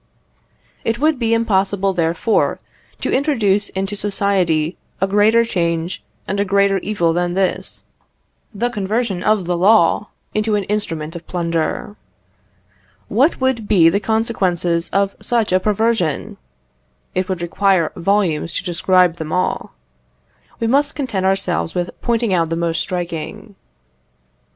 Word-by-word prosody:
It 225 +1 0
would 305 0 +1
be 230 -2 0
impossible, 195 -3 +1
therefore, 170 +5 +1 0.4
to - - -1
introduce 215 -8 +1
into 195 +2 -3
society 190 -5 0 0.2
a 195 - +2
greater 210 +4 +4
change 170 -4 -2 0.2
and 200 +1 -2
a - - +3
greater 200 0 +2
evil 175 -5 0
than 175 +1 -1
this 190 -1 -1 0.7
the 240 +3 -2
conversion 210 -2 -1
of 210 -2 +1
the 175 0 0
law 200 +1 +4 0.3
into 215 0 +1
an 205 - 0
instrument 165 -6 -3
of 170 -1 -9
plunder. 170 +4 -2 1.1
What 275 +8 +2
would 260 -5 0
be 170 -5 +5
the 200 - +1
consequences 185 -7 0
of 200 0 0
such 220 0 0
a 185 - +5
perversion? 210 -6 0 0.8
It 185 +1 -1
would 180 -2 -2
require 185 -1 +2
volumes 170 -4 0
to - - -2
describe 180 -1 +2
them 155 -1 -6
all. 180 - -1 0.8
We 230 - -1
must 285 +6 +2
content 220 -10 -1
ourselves 190 -3 0
with 175 -1 -1
pointing 230 -3 0
out 165 -3 +1
the 165 - -1
most 165 -1 0
striking. 175 +3 -5
195 Hz, 135 wpm, -19 LUFS, 175-215 Hz, 1.1 s, be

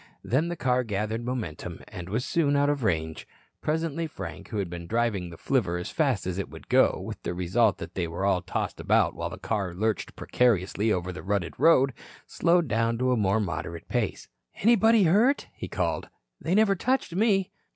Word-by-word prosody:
Then 140 +8 +1
the 175 - -3
car 125 -3 +1
gathered 110 +1 -2
momentum, 120 -11 -5
and 90 0 -8
was 115 +5 -1
soon 145 -4 +1
out 145 +1 +3
of 140 -3 -2
range. 80 -6 -1 0.3
Presently 160 +1 -1
Frank, - - -8
who 110 - -5
had 100 -3 -1
been 85 0 -7
driving 110 -5 0
the 85 - -11
flivver 100 -9 0
as 90 - -5
fast - - +1
as 95 +1 -2
it 100 - -4
would - - -12
go, - - +4
with - - -7
the 85 - -4
result 95 +4 +2
that - - -8
they 90 -3 -2
were 85 +4 -3
all 95 -2 +2
tossed - - -3
about - - +2
while - - -4
the - - -8
car 100 -5 -2
lurched 110 +1 -1
precariously 110 -2 +1
over 90 -2 -1
the 90 - -7
rutted 95 -4 -1
road, 135 -5 +5 0.3
slowed 170 -1 +2
down 115 0 +1
to 130 +1 +1
a - - +3
more 105 -1 +2
moderate 85 -4 -4
pace. 120 -5 -2 0.3
"Anybody 225 0 +4
hurt?" 215 - +3
he - - -7
called. - - -2 0.3
"They 165 +6 0
never 215 -1 +5
touched 255 -1 0
me." 195 -1 +2
115 Hz, 195 wpm, -27 LUFS, -, 0.3 s, road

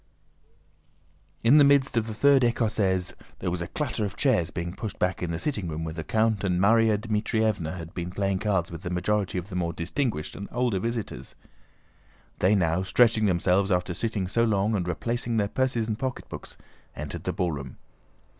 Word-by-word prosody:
In 130 +6 +7
the - - +8
midst 140 -2 +4
of 115 -1 +1
the 110 - -4
third 140 +2 +5
écossaise 105 -6 +1 0.2
there 90 - -2
was 90 0 -2
a 85 - -3
clatter 120 - -2
of 100 -1 -3
chairs 100 - +2
being 85 +1 -4
pushed 105 +1 -6
back 90 +1 0
in 90 - -2
the 85 - -2
sitting 105 - -2
room 80 0 -4
where 80 -1 -4
the 80 0 -5
count 110 +2 +1
and 90 -2 +1
Márya 110 +2 +4
Dmítrievna 105 -5 -1
had 80 0 -8
been 85 0 -4
playing 95 0 -1
cards 95 -6 0
with 85 -1 -7
the 85 - -4
majority 95 +2 0
of 90 +2 -4
the 90 - -6
more 85 -2 -1
distinguished 90 - -2
and 100 - -7
older 120 -5 0
visitors. 115 - -4 1.0
They 95 +3 +4
now, 85 -2 +2
stretching 110 +3 +3
themselves 95 +2 +2
after 90 -1 0
sitting 105 -1 -2
so 115 +5 +1
long, 105 -1 +2
and 90 -4 -1
replacing 115 +6 -1
their 100 -2 +2
purses 125 -1 0
and 110 0 -3
pocketbooks, 130 -2 -6 0.4
entered 75 0 -6
the - - 0
ballroom. 75 -7 -3
100 Hz, 185 wpm, -26 LUFS, 90-115 Hz, 1.0 s, the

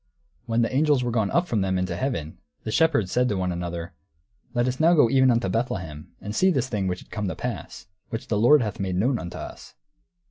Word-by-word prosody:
When 115 0 +2
the 115 - -1
angels 145 -2 +3
were 120 - -1
gone 110 -4 +1
up 175 +1 +1
from 110 -8 0
them 95 -1 0
into 90 -1 -1
heaven, 85 - -3 0.2
the 110 - -4
shepherds 145 - +2
said 125 0 +2
to 100 - -1
one 90 -1 -1
another, 85 0 -5 0.6
"Let 120 +1 +2
us 130 +1 -2
now 165 +2 +5
go 125 -7 +5
even 130 -1 +5
unto 115 -5 +2
Bethlehem, 90 - -3
and 105 +1 -6
see 190 - +4
this 135 -7 +1
thing 100 -5 -1
which 90 0 -3
is - - -26
come 105 -2 -3
to 90 - -3
pass, 100 -6 -6 0.2
which 115 - -5
the 105 - 0
Lord 125 +4 +6
hath 105 -2 -4
made 95 -2 -2
known 120 +6 +1
unto 85 - -7
us." - - -9
115 Hz, 235 wpm, -25 LUFS, 90-125 Hz, 0.6 s, Lord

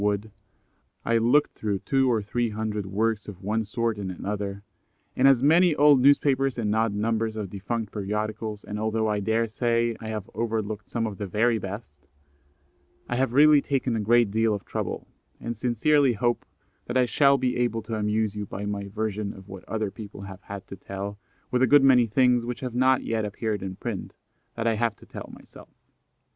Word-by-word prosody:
Wood; 105 +1 -1 0.7
I 115 0 +3
looked 125 +6 +3
through 105 -2 -2
two 135 +5 +1
or 110 -3 +1
three 120 +3 -1
hundred 105 -2 -3
works 105 +2 -1
of 95 -2 -10
one 110 +3 0
sort 115 0 -2
and 95 -2 -4
another, 100 +1 -4 0.5
and 130 - +4
as 135 -2 +5
many 165 +2 +5
old 145 -2 +6
newspapers 135 -1 +3
and 105 -2 0
odd 110 -2 +1
numbers 110 +1 -1
of 105 -4 -5
defunct 105 +2 -4
periodicals, 105 +1 -3
and 105 0 -5
although 110 0 0
I 105 -1 0
daresay 115 +2 0
I 110 - -7
have 110 -3 -4
overlooked 110 -1 -3
some 115 -1 -1
of 105 -3 -5
the 100 - -3
very 110 +4 +2
best, 95 -9 -8 1.0
I 125 - -2
have 130 -2 +1
really 150 +1 +6
taken 130 -4 -1
a - - 0
great 115 0 +3
deal 110 0 +2
of 100 - -8
trouble, - - -4 0.3
and 120 0 -4
sincerely 125 +4 +2
hope 120 +2 0 0.4
that 120 - -1
I 125 - +4
shall 140 +3 +4
be 130 -1 0
able 120 -2 0
to 110 - -6
amuse 105 0 0
you 105 -1 -5
by 100 +2 -5
my 100 -1 -3
version 105 0 -3
of 95 0 -13
what 95 -2 -9
other 110 -3 -2
people 105 -2 -9
have 95 -1 -9
had 100 -1 -8
to - - -7
tell, 100 +1 -6 0.3
with 125 0 +1
a 130 - +5
good 145 +2 +6
many 125 -3 +6
things 125 +1 +3
which 120 0 -5
have 125 -3 -4
not 130 +1 +3
yet 110 -1 -1
appeared 105 0 -3
in 95 0 -5
print, - - -5 0.4
that 115 - -3
I 115 -2 +2
have 115 -1 0
to - - -17
tell - - -9
myself. - - -15
110 Hz, 195 wpm, -26 LUFS, 105-120 Hz, 1.0 s, old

